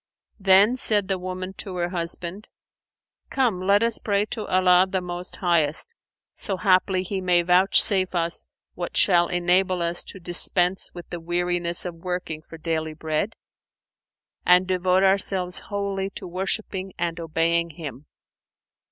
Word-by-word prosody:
Then 200 +5 +5
said 205 -5 0
the 190 -1 0
woman 185 +1 -6
to 190 -2 -6
her 175 -1 -1
husband, 175 +2 -5 0.8
"Come 235 -9 0
let 200 +3 +3
us 230 -1 +1
pray 205 -1 0
to 220 -3 -4
Allah 185 0 +4
the 190 0 -1
Most 180 0 -6
Highest, 170 - 0 0.4
so 195 - -2
haply 185 -1 +2
He 190 +1 -4
may 175 -1 +2
vouchsafe 185 +1 +4
us 170 0 -2 0.3
what - - -5
shall 175 -3 +4
enable 180 +1 +1
us 170 +1 -1
to 195 - -7
dispense 180 +1 +1
with 175 - -9
the 175 - -4
weariness 175 +1 -1
of 175 - -4
working 175 -2 -4
for 165 - -12
daily 160 -1 -3
bread 160 +7 -2 1.1
and 180 +1 +5
devote 185 0 +1
ourselves 190 -2 +3
wholly 200 -1 -2
to - - -7
worshipping 190 +1 -3
and 170 -1 -2
obeying 165 +1 0
Him." 150 -3 -9
180 Hz, 145 wpm, -24 LUFS, 175-190 Hz, 1.1 s, Then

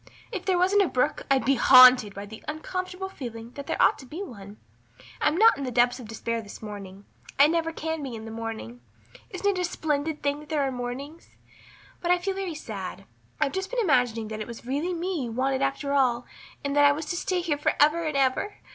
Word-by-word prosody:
If 385 -5 -5
there 375 -2 +2
wasn't 380 +3 +4
a 390 - +3
brook 275 +2 -1
I'd 270 -4 +2
be 275 - +4
haunted 255 -4 +7
by 200 +1 -6
the 220 +2 -11
uncomfortable 365 +4 -4
feeling 235 -9 -8
that 280 +1 -9
there - - -2
ought - - +4
to 265 - -12
be 335 +9 -6
one. 205 - -10 0.6
I'm 315 - +2
not 445 -5 +6
in - - -3
the 260 - -2
depths 245 +1 +2
of 240 - -9
despair 230 +1 -3
this 205 -2 -11
morning. 200 -2 -9 0.3
I 280 - +8
never 325 +1 +1
can 320 -1 -4
be 265 -4 -5
in 220 0 -8
the 225 - -7
morning. 220 - -6 0.5
Isn't 400 +1 0
it - - -2
a - - 0
splendid 310 -2 -2
thing 285 0 0
that 300 - -14
there 300 -3 +1
are 270 - 0
mornings? 260 +6 -7 0.7
But 345 - -2
I 360 - +5
feel 385 +2 -2
very 380 -4 -4
sad. 195 -7 -7 0.3
I've 275 - +1
just 380 0 -3
been - - -2
imagining 245 - +1
that 215 0 -5
it 215 - -5
was 235 0 -9
really 295 +8 -1
me 340 -5 -2
you 235 - -5
wanted 265 +2 0
after 275 +1 -1
all 250 -3 +2 0.4
and 280 0 -1
that 290 - +5
I 285 - +7
was 310 +2 -5
to - - -2
stay 360 +1 -1
here 310 -4 -1
for - - +1
ever 305 +3 +4
and 305 -3 -1
ever. 270 +10 +1
280 Hz, 230 wpm, -26 LUFS, 235-335 Hz, 0.7 s, I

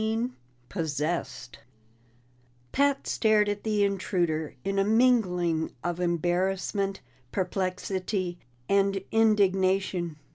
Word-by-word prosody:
16 225 +3 -1 0.3
Possessed 160 -1 -3 1.1
Pat 280 0 +2
stared 215 -2 +3
at 205 0 -2
the 210 -2 +1
intruder 175 -6 -1
in 195 0 0
a - - +4
mingling 195 -8 +2
of 175 0 -2
embarrassment, 185 +3 0 0.3
perplexity, 185 -1 -2 0.3
and 195 -1 +2
indignation. 190 -5 +2
195 Hz, 85 wpm, -27 LUFS, 175-210 Hz, 1.1 s, a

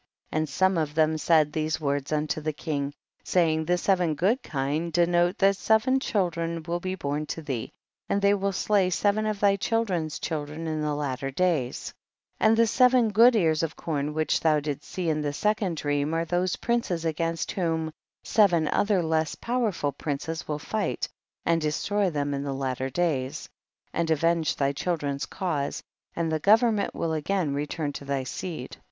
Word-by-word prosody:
23. 155 - 0
And 155 -1 -1
some 190 +5 +2
of 150 -1 -2
them 160 0 +3
said 155 -1 +3
these 155 0 -1
words 140 -1 -1
unto 155 0 -1
the 155 0 -2
king, 145 -2 -3 0.3
saying, 160 -3 +2
the 180 +2 +2
se 195 +3 +3
ven 175 -4 0
good 205 - +1
kine 150 - -2
denote 175 +2 +2
that 195 0 +4
seven 220 +8 +3
chil 195 -8 0
dren 165 0 -3
will 170 +1 -2
be 185 +1 -3
born 150 -2 -3
to 165 - -5
thee, 130 -7 -4 0.4
and 200 - +2
they 200 0 +4
will 200 0 0
slay 195 0 +2
seven 205 +4 +1
of 210 -2 -2
thy 200 -1 +4
children's 190 -9 -1
chil 155 -3 -3
dren 155 +3 -7
in 155 -1 -2
the 150 -1 -1
latter 135 -2 -2
days; 150 -4 -1 0.5
and 220 +1 +4
the 230 - +5
se 250 +3 +5
ven 250 -3 +3
good 230 +4 +6
ears 160 -7 +2
of 165 -2 -2
corn 150 -2 -3
which 155 0 +1
thou 155 -2 +3
didst 145 -1 -4
see 180 -2 -3
in 155 -1 +1
the 145 -1 -2
second 205 -1 0
dream, 145 +1 0
are 165 0 0
those 175 +2 0
princes 225 -8 -1
against 165 +1 -1
whom 160 -3 -1 0.3
seven 180 -9 +3
other 200 -4 +2
less 160 -1 0
powerful 225 - -1
princes 150 +3 -4
will 150 - -2
fight 215 +8 -2 0.4
and 165 -1 +2
destroy 195 +6 0
them 145 -3 -2
in 140 - -2
the 140 -1 -3
latter 130 -1 -2
days, 145 -2 -1 0.5
and 170 -1 0
avenge 165 +1 +2
thy 140 -1 +1
children's 145 -2 -2
cause, 155 -7 -3 0.3
and 165 -1 -1
the 155 - 0
government 215 +3 +3
will 165 -1 -1
again 160 0 0
return 145 +1 -3
to - - -7
thy 140 -1 -2
seed. 135 0 -6
165 Hz, 185 wpm, -26 LUFS, 150-190 Hz, 0.5 s, good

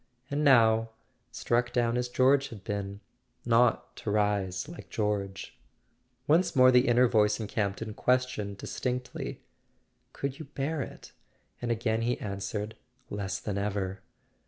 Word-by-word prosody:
And 145 +1 0
now, 115 -5 +5 0.4
struck 120 0 0
down 120 -1 +1
as 125 0 -1
George 135 +2 +3
had 105 -5 -10
been—not 115 +4 -1
to - - -5
rise 100 -1 0
like 170 +2 -10
George... 100 -2 -2 0.7
Once 165 +4 +3
more 130 -1 +7
the 125 +1 +5
inner 125 +1 +5
voice 105 -2 +3
in 110 - -3
Campton 105 +1 -2
questioned 125 -5 0
distinctly: 125 +4 -4 0.7
"Could 140 -1 -4
you 155 - -6
bear 145 +2 -3
it?" - - -8 0.5
and 120 - -2
again 115 -1 0
he 120 +2 +1
an¬ 100 -2 -5
swered: 105 +2 -4 0.4
"Less 100 -2 -3
than 100 -2 -3
ever!" 100 -2 -2
115 Hz, 135 wpm, -29 LUFS, 100-125 Hz, 0.7 s, more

